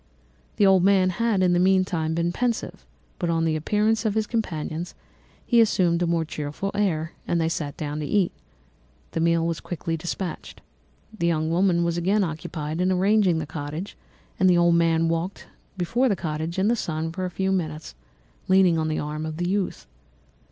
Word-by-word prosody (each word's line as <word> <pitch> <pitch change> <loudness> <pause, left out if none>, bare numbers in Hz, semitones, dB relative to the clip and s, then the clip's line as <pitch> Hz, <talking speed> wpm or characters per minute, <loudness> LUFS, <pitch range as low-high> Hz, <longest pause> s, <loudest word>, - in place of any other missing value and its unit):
"The 205 - +3
old 190 -2 +5
man 190 -1 +4
had, 210 0 +1
in 180 -1 +3
the 175 - +3
meantime, 185 -4 +2
been 170 +1 0
pensive, 240 +4 -3 0.3
but 175 - -1
on 165 -1 +1
the 160 -1 +1
appearance 210 +7 +1
of 215 -2 0
his 220 -1 +1
companions 175 -7 -3 0.5
he 235 -2 +5
assumed 175 -6 +2
a 175 - +1
more 165 -1 +1
cheerful 150 +5 -4
air, 170 -6 0 0.2
and 170 - +1
they 160 - +1
sat 150 -4 -4
down 150 0 -4
to 150 - -3
eat. 195 -1 +2 0.8
The - - -2
meal 165 0 +2
was 165 -1 -1
quickly 165 -1 -4
dispatched. 175 +1 -5 0.6
The 170 -5 0
young 160 -1 0
woman 175 0 +2
was 170 0 0
again 195 +4 +2
occupied 160 -1 -4
in 185 +1 +2
arranging 190 -1 +3
the 160 - -2
cottage, 150 +5 -6 0.4
the 185 -2 +5
old 170 0 +4
man 165 -1 +3
walked 165 +4 -2 0.3
before 240 +9 +1
the 200 - +2
cottage 160 0 -4
in 190 +2 +2
the 235 - +3
sun 160 -6 -3
for 185 +2 -4
a - - -2
few 190 +2 -1
minutes, 155 -4 -3 0.5
leaning 185 -3 +4
on 155 - 0
the 155 - -1
arm 150 +1 -4
of 155 0 -5
the 175 +1 -1
youth. 190 - -2
170 Hz, 185 wpm, -24 LUFS, 160-190 Hz, 0.8 s, old